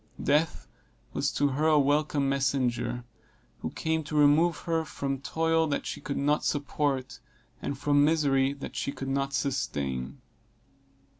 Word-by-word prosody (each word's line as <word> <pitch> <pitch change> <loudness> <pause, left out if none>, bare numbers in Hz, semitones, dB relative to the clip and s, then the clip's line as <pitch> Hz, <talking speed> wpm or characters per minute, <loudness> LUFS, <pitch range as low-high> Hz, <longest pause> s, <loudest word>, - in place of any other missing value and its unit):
Death 150 +3 +1 0.5
was - - 0
to 145 0 +2
her 145 +4 +1
a 155 -1 +5
welcome 145 0 +2
messenger, 130 -3 0 0.6
who - - -3
came 160 0 -1
to 150 0 -3
remove 150 +3 +5
her 165 -1 0
from 140 -3 -3
toil 160 +2 +1
that 145 - -2
she - - -5
could 140 - -4
not 145 +2 +1
support, 140 -2 -1 0.4
and 140 - -3
from 145 0 +3
misery 140 -3 +3
that 140 -1 -8
she - - -2
could 135 -1 -6
not 135 0 0
sustain. 115 - -2
140 Hz, 145 wpm, -28 LUFS, 135-150 Hz, 0.6 s, a